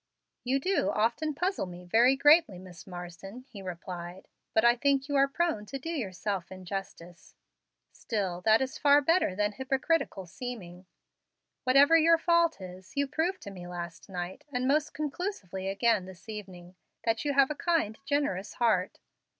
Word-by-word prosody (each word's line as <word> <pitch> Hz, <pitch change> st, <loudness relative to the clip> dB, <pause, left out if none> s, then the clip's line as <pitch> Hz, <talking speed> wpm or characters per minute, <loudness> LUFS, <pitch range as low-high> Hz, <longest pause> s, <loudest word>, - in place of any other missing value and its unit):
"You 260 Hz, +2 st, +1 dB
do 375 Hz, +6 st, +1 dB
often 240 Hz, +8 st, 0 dB
puzzle 365 Hz, -, -1 dB
me 180 Hz, 0 st, -10 dB
very 235 Hz, +8 st, +4 dB
greatly, 290 Hz, -, +5 dB
Miss 180 Hz, 0 st, -12 dB
Marsden," 180 Hz, +6 st, -9 dB
he 205 Hz, -7 st, -10 dB
replied. 180 Hz, 0 st, -7 dB, 0.2 s
"But 220 Hz, -, +3 dB
I 240 Hz, 0 st, +6 dB
think 275 Hz, +1 st, +1 dB
you 285 Hz, -, -2 dB
are 275 Hz, 0 st, +5 dB
prone 275 Hz, -8 st, -1 dB
to 275 Hz, -, -5 dB
do 325 Hz, +5 st, -5 dB
yourself 195 Hz, -, -3 dB
injustice. 185 Hz, -1 st, -8 dB, 0.6 s
Still 190 Hz, -6 st, -3 dB
that 220 Hz, +5 st, +4 dB
is 265 Hz, -, -6 dB
far 285 Hz, 0 st, +6 dB
better 325 Hz, -, +2 dB
than 210 Hz, +1 st, +1 dB
hypocritical 265 Hz, -, -1 dB
seeming. 185 Hz, -3 st, -8 dB, 0.8 s
Whatever 275 Hz, +5 st, +6 dB
your 330 Hz, +1 st, +5 dB
fault 335 Hz, -2 st, +2 dB
is, 185 Hz, 0 st, -10 dB
you 280 Hz, -, +3 dB
proved 325 Hz, +6 st, -1 dB
to 200 Hz, -, -7 dB
me 180 Hz, -2 st, -9 dB
last 175 Hz, 0 st, -7 dB
night, 180 Hz, 0 st, -5 dB
and 250 Hz, -1 st, -1 dB
most 300 Hz, +2 st, +1 dB
conclusively 285 Hz, -, -4 dB
again 200 Hz, 0 st, +2 dB
this 185 Hz, +1 st, -13 dB
evening, 185 Hz, -5 st, -9 dB, 0.3 s
that 225 Hz, 0 st, +1 dB
you 290 Hz, -1 st, 0 dB
have 275 Hz, +1 st, +4 dB
a -, -, -3 dB
kind, 310 Hz, -11 st, 0 dB
generous 275 Hz, -9 st, -1 dB
heart. 215 Hz, -6 st, +1 dB
220 Hz, 160 wpm, -29 LUFS, 185-285 Hz, 0.8 s, I